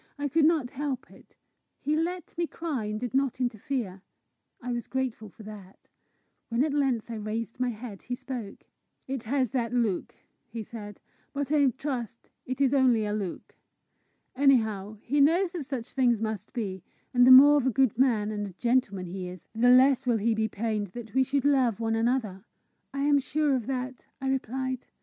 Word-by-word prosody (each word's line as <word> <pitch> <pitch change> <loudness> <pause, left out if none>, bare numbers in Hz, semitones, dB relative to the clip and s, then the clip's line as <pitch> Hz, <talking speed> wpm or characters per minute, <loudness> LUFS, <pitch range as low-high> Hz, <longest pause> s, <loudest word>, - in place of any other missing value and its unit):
I 285 0 -2
could 310 +2 +3
not 305 -6 +2
help 275 -2 -4
it. - - -19 0.4
He 300 +2 0
let 340 +2 -3
me 340 0 -1
cry, 305 -11 -4
and 210 0 -3
did 245 -1 -4
not 270 -2 +1
interfere. 235 -5 -3 0.6
I 250 0 -5
was 240 -1 -3
grateful 255 -5 -3
for 215 - -14
that. 205 -3 -12 0.6
When 235 +3 +2
at 300 -1 0
length 260 -6 0
I 225 - -4
raised 220 +2 -4
my 250 -1 +1
head, 220 -3 -7
he 245 - -4
spoke. 245 -5 -7 0.4
"It 265 -2 -3
has 255 -1 0
that 235 -3 -1
look," 220 -7 0 0.3
he 225 -1 -6
said; 205 -2 -9 0.3
"but 285 0 -3
I 290 -2 +4
trust 250 -3 -5 0.2
it 255 +1 -4
is 275 -1 +3
only 250 -5 +4
a 210 - -2
look. 200 -4 -5 0.8
Anyhow, 220 -7 +2
he 285 +3 +1
knows 340 +5 +4
that 340 -6 -5
such 255 -4 -5
things 245 -4 +3
must 220 -2 -4
be; 195 -6 -4 0.3
and 245 0 +6
the - - +9
more 285 +3 +10
of 265 -2 +1
a - - +5
good 260 -2 +2
man 220 -5 +2
and 205 -1 -3
a 190 - -10
gentleman 230 -3 0
he 180 +1 -5
is, 180 -1 -11
the 235 +2 +3
less 260 +1 +5
will 235 -2 +3
he 225 +2 +1
be 220 0 0
pained 215 -1 -2
that 225 -3 -8
we 265 +1 +4
should 275 +1 -1
love 260 -7 +3
one 225 -1 0
another!" 225 -4 0 0.5
"I 275 0 -3
am 290 0 +4
sure 290 +1 +1
of 240 -4 -3
that," 255 -1 -4
I 265 -1 -2
replied. 260 0 -2
245 Hz, 190 wpm, -28 LUFS, 220-270 Hz, 0.8 s, more